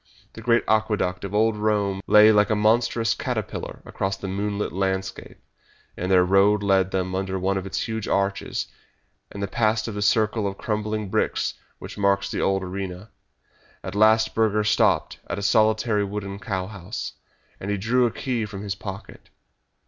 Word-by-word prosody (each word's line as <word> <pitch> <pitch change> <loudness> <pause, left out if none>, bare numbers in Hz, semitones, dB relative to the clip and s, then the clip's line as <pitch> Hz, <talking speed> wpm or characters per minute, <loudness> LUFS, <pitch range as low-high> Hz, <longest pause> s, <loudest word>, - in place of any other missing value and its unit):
The 115 - -10
great 115 +1 +3
Aqueduct 105 -4 +1
of 100 +1 -4
old 110 +1 +3
Rome 105 -2 0
lay 105 +1 +7
like 105 -1 +4
a 110 - +2
monstrous 115 +1 +2
caterpillar - - -4
across 95 0 -3
the 95 - -6
moonlit 100 +2 -2
landscape, 95 0 -3 0.6
and 90 - -3
their 90 -1 +5
road 100 +2 +4
led 95 -2 +3
them 95 -1 -2
under 95 0 -2
one 95 +1 0
of 95 0 -3
its 95 - -2
huge 110 -2 -3
arches, 100 0 -1 0.7
and 100 -1 -5
past 110 -1 +1
the 105 -3 -4
circle 110 0 +2
of 95 0 -5
crumbling 105 -1 -2
bricks - - 0 0.2
which - - -9
marks 100 0 +1
the - - -2
old 95 0 +1
arena. 95 +2 -6 0.7
At - - -5
last 110 +1 +4
Burger 105 -1 +2
stopped 105 - +2
at - - -3
a 100 - -4
solitary 110 0 +3
wooden 100 -1 -5
cow 100 -6 -3
house, 100 +1 -6 0.5
and 95 - -5
he 100 - 0
drew 120 +5 +2
a - - -3
key 120 -4 -2
from 100 -1 -7
his 100 -2 -2
pocket. 95 +1 -9
100 Hz, 170 wpm, -24 LUFS, 95-110 Hz, 0.7 s, lay